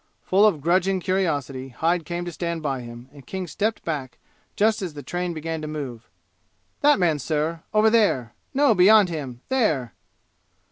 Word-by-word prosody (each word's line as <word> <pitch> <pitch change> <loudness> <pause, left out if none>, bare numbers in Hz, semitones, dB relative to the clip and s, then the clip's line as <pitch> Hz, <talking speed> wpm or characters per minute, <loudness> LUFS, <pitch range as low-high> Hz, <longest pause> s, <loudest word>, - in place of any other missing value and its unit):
Full 200 +3 +4
of 165 -9 0
grudging 185 +4 +2
curiosity 145 -8 -1
Hyde 165 +6 0
came 175 0 -4
to 175 - -4
stand 170 -1 -4
by 135 -3 -2
him, 120 +1 -10
and 140 -2 -13
King 190 -1 -4
stepped 210 +7 -2
back 135 -7 -4 0.4
just 220 +1 +2
as 175 -5 -5
the 145 - -8
train 175 +6 -3
began 160 0 -4
to 155 - -5
move. 135 -7 -6 0.7
"That 295 0 +5
man, 165 -5 +1
sir 160 +3 -2
over 215 +1 +4
there 135 - +2 0.2
no, 280 -3 +4
beyond 200 +1 +6
him 135 -7 -6
there!" 160 - +1
165 Hz, 170 wpm, -24 LUFS, 145-190 Hz, 0.7 s, beyond